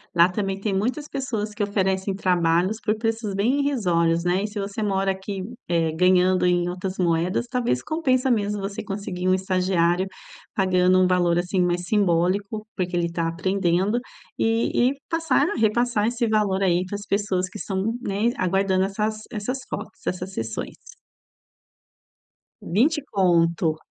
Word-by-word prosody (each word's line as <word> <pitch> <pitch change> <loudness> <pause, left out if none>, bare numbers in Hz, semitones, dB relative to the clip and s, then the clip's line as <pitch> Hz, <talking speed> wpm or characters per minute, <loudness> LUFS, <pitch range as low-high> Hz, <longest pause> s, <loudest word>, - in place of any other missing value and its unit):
Lá 170 +1 +6
também 195 +1 -2
tem 200 0 -2
muitas 245 +10 -1
pessoas 225 -6 -3
que 210 - -6
oferecem 195 -1 0
trabalhos 180 +1 +2
por 215 0 0
preços 225 -2 -2
bem 235 +8 +2
irrisórios, 175 -12 +1
né? 180 +2 +1
E - - -1
se 210 0 -9
você 200 +2 -4
mora 195 -2 +1
aqui 190 +1 -5
em 210 +6 -7
eh, 165 -2 +1
ganhando 180 +1 +4
em 175 0 +2
outras 185 +1 -4
moedas, 175 +4 +1
talvez 240 - -1
compensa 265 -5 +1
mesmo 205 -3 0
você 200 +2 -4
conseguir 195 -3 -4
um 185 - +4
estagiário 185 -1 +1 0.5
pagando 185 -2 +3
um 185 - +5
valor 175 -2 +2
assim 180 +2 0
mais 175 0 0
simbólico, 200 +2 +1
porque 180 -2 -2
ele 170 -1 +1
está 170 0 -2
aprendendo 185 +4 0 0.4
e 230 +2 +2
e - - -3 0.2
passar 330 0 +2
a 415 - -3
repassar 220 0 +2
esse 240 0 0
valor 205 -3 +1
aí 180 -1 +2
para 185 - -5
as 205 0 -7
pessoas 195 -3 0
que 210 - -9
estão, 190 -1 -2 0.2
né, 210 +1 0
aguardando 190 +1 +1
essas 215 +2 -2
essas 245 +4 -3
fotos, 210 - -7
essas 185 +1 -3
sessões. 110 -6 -4 1.9
20 285 - +1
Conto. 170 -4 +2
195 Hz, 160 wpm, -24 LUFS, 180-215 Hz, 1.9 s, Lá